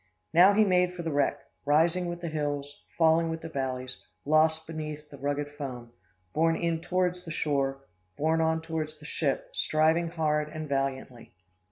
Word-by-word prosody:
Now, 180 +4 +8
he 215 +2 +5
made 180 -2 +2
for 175 - -5
the 165 - -2
wreck, 145 -1 +1 0.2
rising 165 +5 +3
with 175 0 -5
the 170 - -3
hills, 145 -2 -3 0.2
falling 165 0 +4
with 160 0 -4
the 165 - -6
valleys, 130 -3 -3 0.3
lost 160 +2 +3
beneath 155 -2 -6
the 140 - -11
rugged 145 +1 -2
foam, 130 -5 -7 0.4
borne 165 +1 +3
in 165 -1 -1
towards 180 0 0
the 170 - -9
shore, 140 -4 -1 0.4
borne 160 +2 +2
on 160 0 +1
towards 155 -1 -3
the 150 - -14
ship, 145 -3 -1
striving 160 +2 +2
hard 150 -2 0
and 155 0 -6
valiantly. 135 -5 -3
155 Hz, 170 wpm, -28 LUFS, 145-165 Hz, 0.4 s, Now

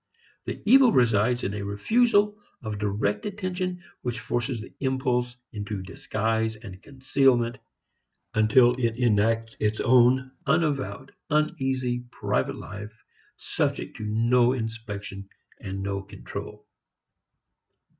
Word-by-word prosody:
The - - -5
evil 255 +2 +7
resides 120 - +3
in 100 - -1
a 105 - -4
refusal 210 - +2 0.3
of 105 -2 -4
direct 105 - -1
attention 185 -3 -3 0.2
which 120 -2 -3
forces 120 +2 -2
the 110 - -10
impulse 125 -2 0 0.2
into 105 -2 -4
disguise 110 +3 -1
and 105 -5 -11
concealment, 130 -2 +1 0.7
until 120 +3 +5
it 115 -2 0
enacts 115 -1 +2
its 105 +1 0
own 130 +2 +4 0.2
unavowed 140 -3 0 0.2
uneasy 135 -5 0
private - - -1
life 105 +2 -9 0.3
subject - - -2
to - - -6
no 120 +3 +3
inspection 105 -4 -6 0.3
and 95 0 -5
no 100 0 -2
control. 100 +1 -9
120 Hz, 110 wpm, -26 LUFS, 105-130 Hz, 0.7 s, evil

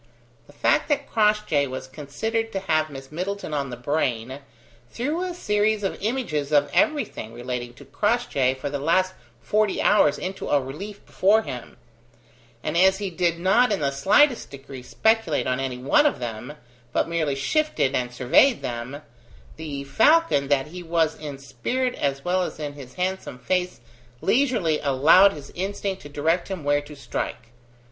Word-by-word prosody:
The - - -17
fact - - +1
that 285 -1 0
Crossjay 210 -10 +2
was 130 0 -6
considered 220 +12 -3
to 195 - -2
have 155 -4 +1
Miss 135 -1 -10
Middleton 185 +1 -4
on 140 -2 -1
the 125 - -6
brain, 130 -1 -2 0.5
threw 295 - -2
a 365 -1 -3
series 210 -7 +1
of 195 - -3
images 190 - -2
of 145 -1 +3
everything 290 - 0
relating 120 0 -5
to - - -14
Crossjay 205 - 0
for 130 - -5
the 140 0 -3
last 185 +6 +2 0.3
forty 215 -1 +1
hours 180 -8 +4
into 190 +1 -5
relief 145 +10 -3
before 215 +4 +3
him: 125 - -8 0.9
and 155 - -2
as 190 +2 +5
he 200 -2 -4
did 170 -1 0
not 205 +7 +3
in 205 - +1
the 140 -1 +1
slightest 225 - +3
degree 135 -1 -10
speculate 220 - +1
on 130 0 0
any 130 -2 -3
one 145 - +4
of - - -1
them, 120 +3 -6 0.4
but - - +1
merely 160 -4 -1
shifted 220 - 0
and 125 -2 -1
surveyed 130 - +3
them, 125 +5 -5 0.5
the 145 -3 -5
falcon 220 - +3
that 140 -1 +2
he 180 +2 -8
was 165 -2 +1
in 145 -3 -6
spirit 140 - -2
as 140 -1 -2
well 185 +1 +1
as 180 - -4
in 145 -1 -4
his 135 -3 -12
handsome 185 -7 -3
face 180 +5 -2 0.4
leisurely 215 - +2
allowed 150 +8 +6
his 145 -5 -10
instinct 195 +1 -3
to 145 - -10
direct 160 +5 0
him 190 -5 -5
where 145 0 +2
to 145 +1 -12
strike. 120 -2 -5
155 Hz, 165 wpm, -24 LUFS, 140-205 Hz, 0.9 s, allowed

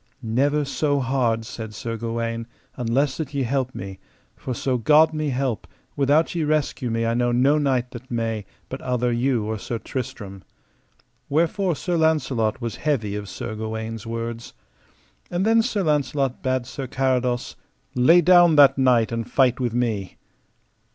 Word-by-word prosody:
Never 140 +6 +1
so 145 0 0
hard, 125 -4 0
said 110 -1 -7
Sir 115 +2 -4
Gawaine, 115 0 -3 0.3
unless 130 +3 0
that 150 -2 -5
ye 140 - +1
help 130 +1 -1
me, 95 0 -7 0.4
for 130 - -5
so 130 0 -1
God 155 +6 +5
me 155 -1 -1
help, 130 -4 -2 0.3
without 145 +3 +2
ye 170 -2 -1
rescue 150 -4 0
me 115 0 -1
I 115 - +1
know 120 0 +1
no 135 +5 +3
knight 130 -4 0
that 125 +1 -10
may, 115 -3 -2 0.2
but - - -7
outher 125 -1 0
you 120 -2 0
or 110 0 -3
Sir 115 - -4
Tristram. 105 -6 -6 0.9
Wherefore 170 +4 +1
Sir 175 +3 -2
Launcelot 135 -9 +1
was 115 -2 -4
heavy 115 -10 -1
of 105 -1 -5
Sir 120 +1 -5
Gawaine's 110 +1 -5
words. 115 0 -5 0.8
And 175 +3 -1
then 225 +1 +5
Sir 220 -4 -1
Launcelot 140 -4 0
bade 130 -2 -1
Sir 130 +1 -6
Carados: 125 -2 -1 0.4
Lay 160 +8 +5
down 175 -1 +6
that 140 -2 +6
knight 125 -4 +3
and 115 -1 -3
fight 130 -2 +3
with 120 -2 -1
me. 110 -6 -2
125 Hz, 160 wpm, -23 LUFS, 115-145 Hz, 0.9 s, down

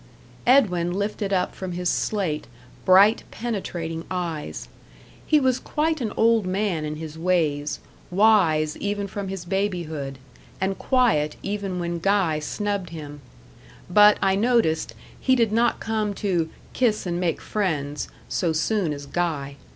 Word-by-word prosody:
Edwin 185 -10 +4
lifted 200 +1 -2
up 180 -2 +1
from 185 -2 -5
his 180 0 -2
slate 180 -6 -1 0.4
bright, 200 +4 +6
penetrating 175 -8 -4
eyes. 155 - -4 0.6
He 305 - +5
was 260 -2 +2
quite 315 0 -1
an 220 -3 -1
old 225 -3 +3
man 185 -4 -1
in 150 0 -3
his 160 0 -8
ways 155 -5 +1 0.3
wise 175 -7 +3
even 205 0 -2
from 200 0 -5
his 190 -2 -5
babyhood, 170 -8 -2 0.4
and 190 +1 -1
quiet 230 - +2
even 200 -2 -3
when 170 -1 -2
Guy 185 -4 +2
snubbed 200 +3 -3
him; 145 -3 -8 0.7
but, 210 +2 +7
I 195 - +4
noticed, 210 -8 +1 0.2
he 260 - +3
did 230 -4 +2
not 235 +2 +2
come 215 -2 -1
to 175 -6 0 0.2
"kiss 225 -6 +1
and 175 -1 -2
make 175 -3 0
friends" 150 -8 -2 0.2
so 170 -3 0
soon 170 0 0
as 140 0 -7
Guy. 145 -4 -2
185 Hz, 140 wpm, -24 LUFS, 160-210 Hz, 0.7 s, but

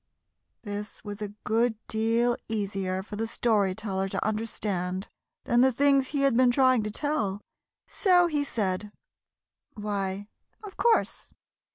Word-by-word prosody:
This 205 -1 -6
was 205 0 -7
a 210 - -2 0.2
good 230 +1 +2
deal 230 +2 +2
easier 195 -3 -2
for 205 +1 -8
the 225 +1 -1
Story 210 -5 +1
Teller 195 -2 -2
to - - -2
understand 205 -4 -2 0.4
than 240 0 +3
the 260 +1 +5
things 275 +1 +3
he 285 0 -1
had 275 -3 +3
been 255 +1 +5
trying 255 -1 +4
to 210 - -3
tell, 215 -5 -1 0.5
so 360 -3 +3
he 300 -4 0
said, 205 -5 -2 0.8
"Why, 205 -2 -3 0.4
of 405 -2 -9
course. 470 -1 +1
220 Hz, 140 wpm, -27 LUFS, 200-255 Hz, 0.8 s, the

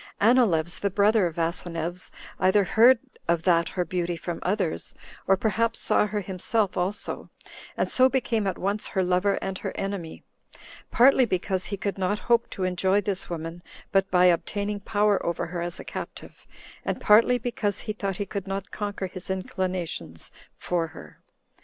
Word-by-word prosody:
Anileus, 200 -8 +3
the 200 - 0
brother 205 0 +3
of 165 - -8
Asineus, 170 +1 -2 0.3
either 190 +2 +4
heard 235 +6 +6 0.3
of 170 -1 +1
that 170 -2 +3
her 180 -2 -2
beauty 175 -1 -2
from 170 0 -5
others, 185 -3 -2 0.3
or 195 - +5
perhaps 225 +3 0
saw - - +2
her 210 0 -2
himself 195 +2 0
also, 190 +4 -3 0.5
and - - +1
so 260 0 +4
became 235 -5 0
at 190 - -2
once 200 +2 -2
her 190 - 0
lover 185 +2 +2
and 190 -1 -3
her - - -4
enemy; 195 -5 -4 0.7
partly 260 +2 +5
because 185 -2 -1
he 200 +2 -4
could 195 0 -3
not 190 +2 0
hope 235 +1 +1
to 190 - -4
enjoy 185 +2 +2
this 200 -2 -2
woman 165 0 -5 0.3
but 195 -1 +2
by 180 0 +4
obtaining 205 +4 +1
power 205 0 +1
over 170 - -1
her 170 0 -5
as 175 0 -3
a - - -7
captive, - - -8 0.4
and - - -2
partly 230 +4 +5
because 215 -4 -2
he 215 - -4
thought 195 -3 -3
he 205 - -2
could 200 -1 -5
not 195 +1 -4
conquer 205 -2 -3
his 185 0 -7
inclinations 185 - -3 0.2
for 170 -2 -2
her. 75 - -13
190 Hz, 170 wpm, -26 LUFS, 175-210 Hz, 0.7 s, heard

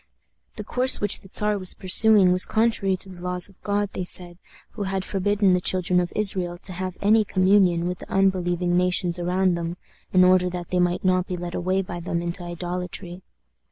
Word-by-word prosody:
The 210 - -6
course 250 +4 +2
which 205 -1 +2
the 190 - -16
Czar 210 -1 0
was 185 -1 -1
pursuing 195 0 +5
was 185 0 +3
contrary 215 -4 +1
to 190 - -4
the 180 -2 -11
laws 180 +1 -1
of 195 - -23
God, 205 -1 -1
they 185 - -3
said, 175 -1 -5 0.3
who - - -9
had 190 -1 -3
forbidden 200 0 +1
the 180 - +1
children 180 0 +1
of 175 -1 -2
Israel 185 -4 0
to 185 - -4
have 185 0 -5
any 215 +2 +4
communion 185 -3 +2
with 180 0 -3
the - - -12
unbelieving 180 -2 +1
nations 180 -1 +1
around 180 +1 +1
them, 170 0 -4 0.3
in 185 -1 +5
order 180 0 +4
that 175 -1 -7
they 180 - +1
might 180 +1 0
not 185 0 +1
be 180 - -4
led 175 0 -6
away 185 +2 -1
by 175 -1 -7
them 170 0 -3
into 175 +2 -4
idolatry. 175 +1 -6
185 Hz, 200 wpm, -23 LUFS, 175-195 Hz, 0.3 s, pursuing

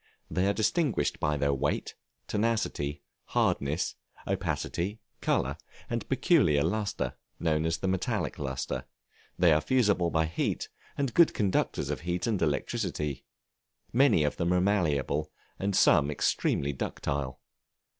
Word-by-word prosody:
They 90 +2 +1
are 100 - +3
distinguished 120 +6 +1
by 75 0 +1
their 70 0 +1
weight, 65 - -1 0.3
tenacity, 105 -10 -1 0.2
hardness, 70 +4 0 0.3
opacity, 100 +6 -2 0.2
color, - - +1 0.3
and - - -2
peculiar 70 -1 +4
lustre, 100 +5 -1 0.3
known 80 -1 +1
as 80 +1 0
the 95 - -3
metallic 95 -1 -1
lustre; 65 -2 -3 0.5
they 85 -3 +5
are 75 - +3
fusible 100 - +2
by 80 -1 +2
heat, 80 +2 -2 0.3
and 140 -3 -1
good 170 -2 +5
conductors 100 -3 0
of - - -2
heat 90 +3 -2
and 110 -6 0
electricity; 75 -2 -1 0.7
many 120 - +5
of 75 - -1
them 85 0 +1
are - - +4
malleable, 75 -6 +1 0.3
and 100 0 0
some 70 0 +5
extremely 70 -1 0
ductile. 70 0 -3
85 Hz, 130 wpm, -29 LUFS, 75-100 Hz, 0.7 s, they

